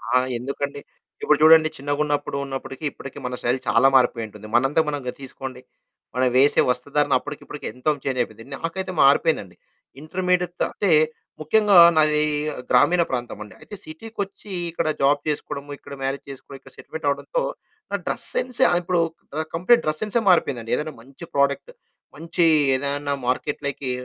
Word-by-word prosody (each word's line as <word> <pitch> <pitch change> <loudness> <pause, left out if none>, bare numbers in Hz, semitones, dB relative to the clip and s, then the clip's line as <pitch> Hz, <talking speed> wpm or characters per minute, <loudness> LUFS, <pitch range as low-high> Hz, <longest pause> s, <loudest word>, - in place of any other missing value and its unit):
ఆ! - - +7 0.2
ఎందుకండి? 140 +3 -4 0.4
ఇప్పుడు 150 - +4
చూడండి 160 0 +7
చిన్నగున్నపుడు 145 0 -1
ఉన్నప్పటికి 135 +1 -7
ఇప్పటికి 135 - -10
మన 125 0 -3
శైలి 125 +2 +1
చాలా 115 +5 +5
మారిపోయి 120 -3 +3
ఉంటుంది. 105 0 -12
మనంతా 135 +6 +3
మనంగా 140 -4 -3
తీసుకోండి. 130 -1 -8 0.5
మనం 130 0 +2
వేసే 140 +2 +5
వస్తుధారణ 140 +3 0
అప్పటికి 145 +2 -8
ఇప్పటికి 150 - -9
ఎంతో 125 +5 0
చేంజ్ 130 -2 -2
అయిపోయింది. 115 -1 -6
నాకైతే 185 +6 -4
మారిపోయిందండి. 140 - +3 0.5
ఇంటర్మీడియట్‌తో 180 +2 -1
అంటే 200 -4 +1 0.5
ముఖ్యంగా 205 +5 +4 0.2
నాది 150 -1 +3 0.5
గ్రామీణ 170 +8 +4
ప్రాంతమండి. 120 -4 -5
అయితే 205 - -9
సిటీకొచ్చి 200 +5 -7 0.2
ఇక్కడ 165 -1 -2
జాబ్ 145 +1 +4
చేసుకోవడము, 145 -1 -4
ఇక్కడ - - -11
మ్యారేజ్ 135 +1 -2
చేసుకోవడం, 135 0 -10
ఇక్కడ 135 - -16
సెటిల్‌మెంట్ 160 -1 -8
అవ్వడంతో 145 - -1 0.5
నా - - 0
డ్రెస్ - - -2
సెన్స్ 255 - -1
ఆ - - +1
ఇప్పుడు 175 -1 +1 0.3
క - - -5
ఆ - - -2
కంప్లీట్ 235 +8 +4
డ్రెస్ 155 0 -2
సెన్సే 215 +2 0
మారిపోయిందండి. 125 -10 +2
ఏదైనా 155 +1 -4
మంచి 135 +7 -12
ప్రోడక్ట్, 140 - +1 0.4
మంచి 165 +1 0 0.3
ఏదైనా 140 +1 -2
మార్కెట్‌లకి 140 0 -2
145 Hz, 145 wpm, -23 LUFS, 130-165 Hz, 0.5 s, ఆ